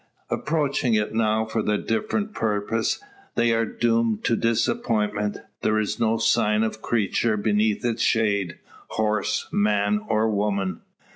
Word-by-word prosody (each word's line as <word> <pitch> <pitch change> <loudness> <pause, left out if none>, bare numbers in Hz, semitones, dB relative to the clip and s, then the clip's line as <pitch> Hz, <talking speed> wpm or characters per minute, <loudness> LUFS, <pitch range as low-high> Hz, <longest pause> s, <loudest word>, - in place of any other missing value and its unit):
Approaching 145 -6 0
it 105 0 0
now 110 0 +1
for 110 +1 -2
a 105 -1 +1
different 210 - -2
purpose, 110 - -1 0.4
they 120 0 +3
are 115 0 +2
doomed 115 -2 +1
to 115 - +2
disappointment. 105 -2 0 0.2
There 110 - +2
is 105 0 -1
no 115 0 +2
sign 110 -1 +2
of 110 0 -3
creature 110 0 +1
beneath 105 +1 +1
its 115 -1 0
shade 100 -5 +1 0.3
horse, 105 -1 -1
man, 105 0 +2
or 110 0 +2
woman! 100 -3 -1
110 Hz, 135 wpm, -24 LUFS, 105-115 Hz, 0.4 s, they